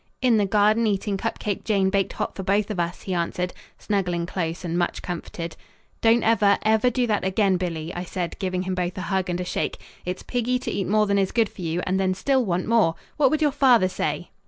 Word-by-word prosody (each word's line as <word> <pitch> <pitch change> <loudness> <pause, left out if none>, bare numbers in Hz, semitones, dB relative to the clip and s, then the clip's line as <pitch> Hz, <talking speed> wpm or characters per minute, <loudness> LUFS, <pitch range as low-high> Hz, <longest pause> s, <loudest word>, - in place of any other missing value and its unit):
"In 245 -3 +3
the 205 -2 +2
garden 215 +3 +3
eating 200 0 0
cup 195 - -3
cake 205 -2 -3
Jane 195 -3 +2
baked 195 -1 0
hot - - -3
for - - -4
both 200 +3 +1
of 195 - -3
us," 175 0 -2
he 190 - -3
answered, 180 +1 -1 0.2
snuggling 180 -5 -1
close 170 0 -3
and 170 0 -2
much 175 0 -1
comforted. 170 -1 -5 0.5
"Don't 230 +1 +4
ever, 210 -3 +4
ever 220 +3 +3
do 245 0 0
that 215 -3 0
again, 190 0 +2
Billy," 170 -2 -4
I 175 - -4
said, 180 -1 -4
giving 185 -1 -1
him 185 0 -2
both 180 -1 -2
a - - -3
hug 190 -1 -1
and 175 0 -1
a 180 - -3
shake. - - -2 0.3
"It's 180 +1 -4
piggy 245 0 0
to 250 - -4
eat 195 - -2
more 215 +1 +3
than 200 -1 +2
is 190 -1 +1
good 230 -3 +2
for - - -11
you 170 +1 -1
and 190 +1 0
then 185 -1 +1
still 265 +5 +2
want 180 -4 -1
more. 220 -8 +3 0.2
What 285 -3 +5
would 310 +2 +1
your 295 - +3
father 245 -8 +5
say?" 185 - -3
190 Hz, 235 wpm, -24 LUFS, 180-220 Hz, 0.5 s, What